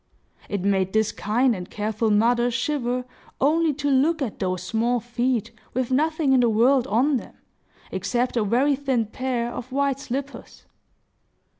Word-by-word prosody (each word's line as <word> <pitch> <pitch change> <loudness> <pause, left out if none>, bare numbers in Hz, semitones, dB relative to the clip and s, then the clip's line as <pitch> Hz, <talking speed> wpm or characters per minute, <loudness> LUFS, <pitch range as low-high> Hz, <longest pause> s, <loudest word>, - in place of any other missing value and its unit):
It 200 -2 -2
made 190 -1 +1
this 220 -1 +2
kind 240 +3 +1
and 180 -1 -7
careful 215 +1 -1
mother 240 +3 +3
shiver 245 0 -1 0.3
only 315 +3 +3
to 285 0 -1
look 300 +5 +3
at 260 -7 -4
those 185 -1 -2
small 230 +5 0
feet, 240 -1 -1 0.2
with 255 0 -1
nothing 305 +1 +2
in 260 - +5
the 240 -1 +4
world 245 +4 +3
on 260 +7 +2
them, - - -10 0.6
except 240 +7 -1
a 230 - +2
very 255 +7 +2
thin 260 -4 0
pair 240 +1 -3
of 250 +2 -7
white 275 0 0
slippers. 275 +2 -6
245 Hz, 155 wpm, -24 LUFS, 220-270 Hz, 0.6 s, in